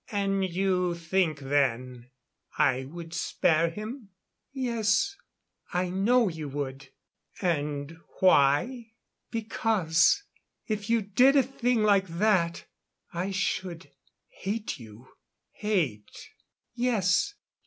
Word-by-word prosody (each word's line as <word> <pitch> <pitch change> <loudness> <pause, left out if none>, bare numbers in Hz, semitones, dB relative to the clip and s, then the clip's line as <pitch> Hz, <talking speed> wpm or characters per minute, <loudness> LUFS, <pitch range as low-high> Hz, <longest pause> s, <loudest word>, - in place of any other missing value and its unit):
"And 195 -2 0
you 180 -1 0
think 170 -1 0
then 130 -3 -1 0.5
I 130 -1 +2
would 165 +3 -9
spare 165 0 +2
him?" 215 +5 -7 0.4
"Yes. 245 - 0 0.6
I 180 0 0
know 225 +5 +3
you 160 -4 -5
would." 135 -1 -5 0.5
"And 150 -3 -2 0.2
why?" 190 - +3 0.4
"Because 220 - +2 0.4
if 215 0 -3
you 230 -2 +2
did 250 +8 +4
a 275 - +6
thing 245 -3 0
like 200 -2 +4
that 170 -1 +1 0.5
I 175 +3 -2
should 185 -5 -3 0.4
hate 210 -3 -4
you." 115 +2 -13 0.4
"Hate 160 - -2 0.2
" - - -61
"Yes. 245 - +1
185 Hz, 100 wpm, -28 LUFS, 155-220 Hz, 0.6 s, a